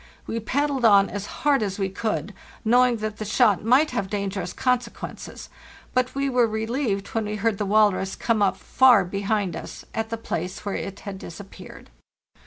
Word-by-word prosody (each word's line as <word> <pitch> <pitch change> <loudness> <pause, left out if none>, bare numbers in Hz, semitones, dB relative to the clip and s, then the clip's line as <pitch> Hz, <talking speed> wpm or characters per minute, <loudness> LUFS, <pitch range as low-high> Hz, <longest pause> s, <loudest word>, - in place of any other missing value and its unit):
We 230 - -3
paddled 275 +3 -1
on 200 -3 +6
as 200 0 -5
hard 290 -3 +1
as 195 -2 -2
we 195 -2 0
could, 195 -2 -3 0.3
knowing 245 +1 +4
that 215 -1 -4
the 215 - -4
shot 215 -2 +3
might 260 +7 +4
have 200 -6 -2
dangerous 200 -1 -3
consequences, 250 -2 -3 0.5
but 255 0 0
we 275 0 0
were 250 -3 +3
relieved 220 -1 -2
when 225 -1 -2
we 210 0 -3
heard 215 0 0
the 205 - -1
walrus 200 -2 +3
come 225 -3 0
up 190 -2 +2
far 245 -3 +5
behind 200 -1 -1
us - - -8
at 225 0 -2
the 230 - -3
place 180 -4 -5
where 200 - -2
it 195 0 -5
had 195 -2 -7
disappeared. 195 +3 -11
215 Hz, 180 wpm, -24 LUFS, 195-240 Hz, 0.5 s, on